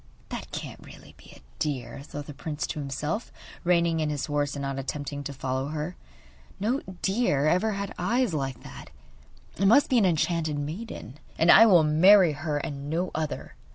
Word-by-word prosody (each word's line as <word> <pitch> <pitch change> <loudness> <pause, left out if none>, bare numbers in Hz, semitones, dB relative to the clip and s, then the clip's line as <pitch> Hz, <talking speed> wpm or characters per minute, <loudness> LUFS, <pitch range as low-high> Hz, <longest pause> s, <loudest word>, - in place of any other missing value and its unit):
'That - - -6
can't - - -7
really - - -14
be - - -17
a - - -17 0.2
deer,' 135 -4 -3
thought 145 0 -8
the 150 - -8
prince 150 +1 -4
to - - -5
himself, 150 - -3 0.3
reining 170 -2 +2
in 155 -1 0
his 145 -2 -2
horse 145 -1 -1
and 140 - -4
not 135 0 -3
attempting 145 +1 -4
to 140 - -5
follow 130 0 -3
her. 155 +4 -4 0.6
'No 230 +7 0 0.2
deer 190 - +1
ever 185 +7 +2
had 200 0 -4
eyes 230 +3 +1
like 135 -4 -3
that. - - -11 0.7
It 195 - +3
must 255 +8 +5
be 250 - +5
an 205 - +3
enchanted 160 -2 0
maiden, 150 - -6 0.2
and 165 +1 +5
I 225 - +9
will 175 -6 +6
marry 175 +4 +6
her 150 +1 -3
and 140 0 -5
no 175 +3 -1
other. 155 -1 -4
155 Hz, 185 wpm, -27 LUFS, 145-180 Hz, 0.7 s, I